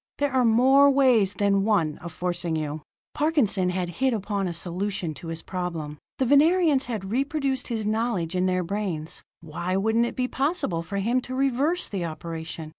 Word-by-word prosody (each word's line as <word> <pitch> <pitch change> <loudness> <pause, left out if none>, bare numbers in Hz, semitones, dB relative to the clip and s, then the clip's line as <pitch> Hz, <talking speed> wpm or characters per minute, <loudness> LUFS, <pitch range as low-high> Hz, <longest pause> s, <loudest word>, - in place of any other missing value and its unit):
There 285 -2 0
are 260 -1 +3
more 260 +5 +5
ways 250 -8 +3
than 200 -1 +2
one 180 -8 +1
of 170 - -8
forcing 175 0 -2
you." 155 0 -3 0.3
Parkinson 275 - +1
had 180 -1 -2
hit 265 -3 +3
upon 200 -2 -2
a - - -2
solution 175 0 -3
to 160 +4 -10
his 165 0 -5
problem. 165 -5 -5 0.2
The 260 - +1
Venerians 295 +1 +4
had 205 -5 -4
reproduced 275 +1 -1
his 225 -3 -3
knowledge 215 -6 -1
in 185 0 +1
their 185 0 +1
brains; 175 -4 -4 0.2
why 170 +3 -3
wouldn't 220 +4 +2
it - - -6
be 250 -1 0
possible 270 - -1
for 200 +4 -5
him 235 +6 +1
to 255 +1 -6
reverse 275 +6 +1
the 195 -4 -3
operation? 165 -1 -6
200 Hz, 180 wpm, -25 LUFS, 175-255 Hz, 0.3 s, more